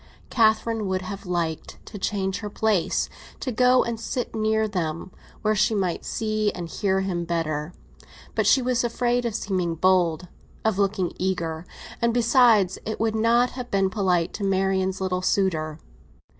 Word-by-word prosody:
Catherine 220 -1 +2
would 185 0 -1
have 195 0 -7
liked 170 -3 -2
to 205 - -9
change 190 -1 -1
her 210 - -5
place, 210 -4 +1 0.3
to 255 - -3
go 250 +2 +4
and 235 -1 -4
sit 245 +2 -3
near 220 0 +1
them, 175 -3 -3 0.3
where 215 0 +3
she 215 +2 +2
might 185 -4 -1
see 215 -2 0
and 175 -2 -5
hear 190 +2 0
him 180 -3 -2
better. 165 -2 -2 0.6
But - - +1
she 265 - +5
was 245 -1 +1
afraid 240 +1 0
of 230 -3 -2
seeming 185 -6 -1
bold—of 185 +3 0
looking 195 -3 +1
eager; 170 -3 -2 0.3
and, 235 0 +2
besides, 230 -6 +4
it 220 - -4
would 225 -1 +1
not 235 +3 +3
have 250 -1 -7
been 195 -1 +1
polite 180 -5 +1
to 205 - -5
Marian's 190 -1 0
little 185 -1 -1
suitor. 165 -5 0
195 Hz, 155 wpm, -24 LUFS, 180-220 Hz, 0.6 s, she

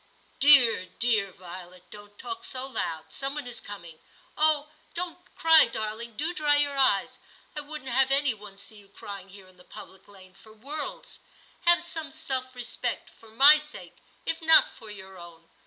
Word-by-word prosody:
'Dear 255 -9 +6
dear 220 -5 +1
Violet! 180 0 -12
don't 205 0 -13
talk 380 0 -7
so 265 -9 -4
loud; 165 -12 -4
some 275 +1 -3
one 295 -3 -5
is 240 -1 -6
coming. 170 -6 -10 0.4
Oh! 305 -1 +2 0.2
don't 350 0 -4 0.2
cry, 320 -3 +7
darling; 220 +1 -6
do 320 +4 -2
dry 300 -4 +2
your 290 -1 +1
eyes. 260 -8 +2 0.4
I 300 - -3
wouldn't 290 -3 -7
have 265 +2 +3
any 275 -1 +3
one 205 -2 -13
see 215 +2 -9
you 200 -1 -16
crying 195 -1 -10
here 195 -1 -14
in 185 -1 -21
the 180 - -18
public 190 +1 -13
lane 185 -2 -15
for 215 +3 -18
worlds. 285 +8 -6 0.5
Have 345 +1 +5
some 320 -2 -6
self 265 -4 -4
respect, 245 0 -4
for 225 - -19
my 280 +7 +7
sake 300 0 -11 0.3
if 325 - -2
not 320 0 +6
for 220 - -14
your 190 -2 -11
own. 170 -1 -14
245 Hz, 175 wpm, -27 LUFS, 200-295 Hz, 0.5 s, cry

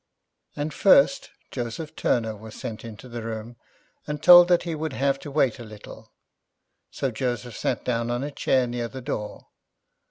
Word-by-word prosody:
And 145 +1 -3
first, 275 +7 +4 0.2
Joseph 140 +6 -5
Turner 110 -2 0
was 110 +1 -11
sent 110 -2 -7
into 115 +2 -10
the 120 -1 -6
room, 115 +1 -6 0.5
and 150 0 -3
told 175 +2 +9
that 175 -1 +3
he 170 -1 -3
would 155 -2 -4
have 135 +1 0
to 140 - -8
wait 135 -5 +1
a - - -7
little; 105 -2 -12 0.8
so 135 - -2
Joseph 120 -1 -3
sat - - -2
down 120 -1 -1
on 120 +2 -1
a 145 - -4
chair 130 -2 +1
near 120 -1 -3
the 130 +2 -9
door. 105 -5 -5
125 Hz, 170 wpm, -25 LUFS, 115-150 Hz, 0.8 s, told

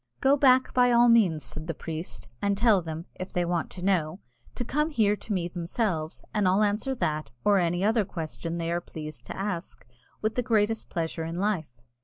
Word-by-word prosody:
"Go 270 +1 +4
back 260 -2 +4
by 245 -1 +4
all 240 0 +6
means," 185 -10 +4
said 155 +5 -7
the 165 - -3
priest, 160 -7 -6
"and 200 0 +1
tell 215 -3 +4
them, 160 0 -6
if 185 - -5
they 175 -1 0
want 170 -1 -1
to 180 - -9
know, 180 -3 +1 0.4
to 245 - -3
come 300 +6 0
here 215 -8 +3
to 220 - -9
me 180 -4 0
themselves, 170 -1 -2
and 210 -3 +2
I'll 190 +3 +4
answer 215 +6 0
that 155 -10 -1 0.2
or 205 -1 +5
any 175 +1 0
other 220 0 +3
question 165 -2 -5
they 165 0 -2
are 175 0 0
pleased 155 -2 -8
to - - -6
ask 190 -3 -4 0.3
with 215 +1 -1
the 250 - 0
greatest 225 -2 +1
pleasure 165 -1 -2
in 165 +1 -4
life." 175 - -1
185 Hz, 205 wpm, -27 LUFS, 165-220 Hz, 0.4 s, all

